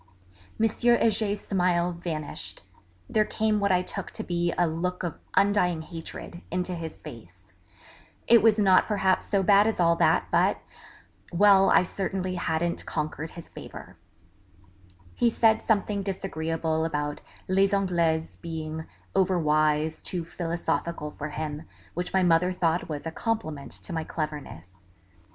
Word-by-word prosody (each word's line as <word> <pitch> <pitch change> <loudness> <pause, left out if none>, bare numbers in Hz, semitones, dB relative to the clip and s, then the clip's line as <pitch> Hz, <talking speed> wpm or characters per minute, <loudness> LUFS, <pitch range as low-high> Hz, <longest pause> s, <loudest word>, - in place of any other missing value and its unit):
M. 225 - +4
Heger's 220 -3 +2
smiles 180 -2 +1
vanished; 160 -4 -5 0.4
there 215 - +2
came 215 0 0
what 200 -1 +1
I 180 0 +3
took - - -5
to - - -4
be 175 -1 0
a 175 - +2
'look 175 +3 -2
of 170 -3 -4 0.2
undying 190 -5 +3
hatred' 165 +1 -8
into 180 +1 -2
his 165 -2 -7
face - - -12 0.7
it 235 -2 +7
was 220 0 +5
not 195 -3 +5
perhaps 195 -3 +1
so 200 -2 +1
bad 200 +2 +5
as 225 - -1
all 170 -1 +4
that, 165 0 +3
but... - - +3 0.7
well, 195 +1 +6
I - - +5
certainly 185 0 -3
hadn't 170 -1 -1
conquered 155 0 -3
his 170 - -10
favour. - - -10 1.2
He 240 - +2
said 225 -1 +3
something 205 -2 +1
disagreeable 165 -4 -2
about 150 -2 -2 0.3
Les 195 +1 +3
Anglaises 170 -5 0
being 160 -1 -5 0.3
over 190 -1 +2
wise, 155 0 +1
too 175 -3 -4
philosophical 170 -2 -3
for 150 +1 -6
him, 150 +1 -5 0.3
which 180 +1 -3
my 190 -1 +2
mother 175 +1 +3
thought 170 -2 0
was 150 0 -5
a 165 - -3
compliment 160 -9 -3
to 180 - -8
my 160 -1 -1
cleverness. 95 - -6
175 Hz, 140 wpm, -27 LUFS, 160-195 Hz, 1.2 s, it